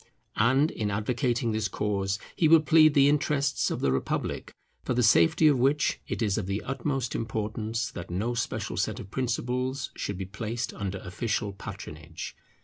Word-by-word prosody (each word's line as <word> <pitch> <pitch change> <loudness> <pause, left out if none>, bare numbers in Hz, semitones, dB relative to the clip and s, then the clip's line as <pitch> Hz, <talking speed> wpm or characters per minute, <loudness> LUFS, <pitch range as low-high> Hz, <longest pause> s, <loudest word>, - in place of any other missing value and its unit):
And 130 +8 +3
in 105 -2 -2
advocating 120 +3 0
this 110 -1 0
cause, 100 -1 -1 0.2
he 160 - +3
will 160 0 +7
plead 155 -1 +5
the 140 -1 +6
interests 140 -2 +1
of - - -3
the 70 - +2
republic, 65 - -2 0.3
for 125 - -1
the 125 - +2
safety 105 - +5
of 140 -4 +4
which 140 +4 +2
it - - -2
is 100 -3 +1
of - - -4
the 100 +2 -2
utmost 135 -2 -2
importance 110 +1 -2
that 85 - -7
no 105 +8 -1
special 120 - -3
set - - -1
of 100 - -9
principles 130 +2 -2
should 100 - -4
be 95 - -4
placed 115 +5 -4
under 100 -1 -4
official 105 +1 -2
patronage. 80 -4 -8
115 Hz, 170 wpm, -28 LUFS, 100-135 Hz, 0.3 s, will